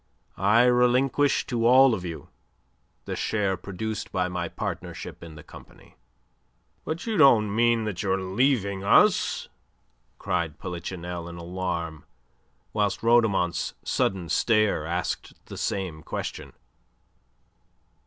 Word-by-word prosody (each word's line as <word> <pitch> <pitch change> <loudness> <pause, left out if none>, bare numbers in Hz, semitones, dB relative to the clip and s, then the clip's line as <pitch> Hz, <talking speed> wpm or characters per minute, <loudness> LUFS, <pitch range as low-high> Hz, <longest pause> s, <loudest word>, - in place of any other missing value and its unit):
I 105 +5 +5
relinquish 125 +3 +3
to 115 -2 0
all 130 +1 +7
of 95 -5 -3
you 85 -3 -7 0.8
the - - -4
share 100 -3 0
produced 100 +3 -5
by 90 0 0
my 90 0 -3
partnership - - -6
in 85 -2 -10
the 80 - -11
company." - - -16 0.9
"But 160 +2 -4
you 225 -2 -1
don't 110 -6 +5
mean 120 0 +3
that 105 -5 -3
you 95 -2 -1
are 95 - 0
leaving 100 0 0
us?" 100 - +3 0.7
cried 80 -3 -2
Polichinelle 90 0 -6
in 85 - -9
alarm, 85 -3 -4 0.7
whilst 105 -1 0
Rhodomont's 110 -7 +2
sudden 95 -3 -1
stare 105 -3 +2
asked 85 +1 -3
the - - -9
same 90 -6 -3
question. - - -6
100 Hz, 120 wpm, -26 LUFS, 90-115 Hz, 0.9 s, all